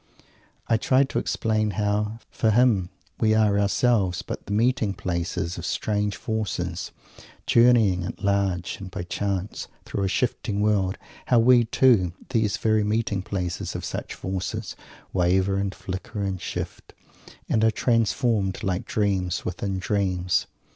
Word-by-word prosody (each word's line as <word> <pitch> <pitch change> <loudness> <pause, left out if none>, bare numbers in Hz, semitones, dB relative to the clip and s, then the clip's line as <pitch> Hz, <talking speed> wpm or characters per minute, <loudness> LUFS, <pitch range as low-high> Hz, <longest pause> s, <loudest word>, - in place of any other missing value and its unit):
I 115 - +3
try 130 +4 +3
to 135 - -1
explain 110 -1 0
how, 105 +1 0
for 110 - +1
him, 110 -5 +3 0.3
we 110 -1 +3
are 105 -2 +3
ourselves 100 -3 +2
but - - -7
the - - -6
meeting 110 -2 +1
places 85 0 -3
of - - -7
strange 105 +1 -1
forces, 95 -6 -3 0.6
journeying 115 -7 +4
at 95 - -7
large 100 -3 0
and 95 -1 -7
by 90 -1 -5
chance 100 +1 -3 0.2
through 100 - -2
a - - +1
shifting 105 0 -1
world; 100 -3 +1 0.3
how 125 - +4
we, 120 +1 +6
too, 110 -7 +3 0.2
these 110 -5 +1
very 110 -1 +2
meeting 105 -1 0
places 90 -2 -3
of - - -4
such - - -5
forces, 95 +2 -4 0.4
waver 95 +2 +2
and 100 -1 -2
flicker 100 +3 -5
and 95 -2 -2
shift - - -6 0.5
and 110 - +2
are 110 - +6
transformed, 115 -3 +1
like 95 0 -1
dreams 95 -4 0
within 95 +2 -2
dreams! 95 -2 0
100 Hz, 140 wpm, -25 LUFS, 95-110 Hz, 0.6 s, we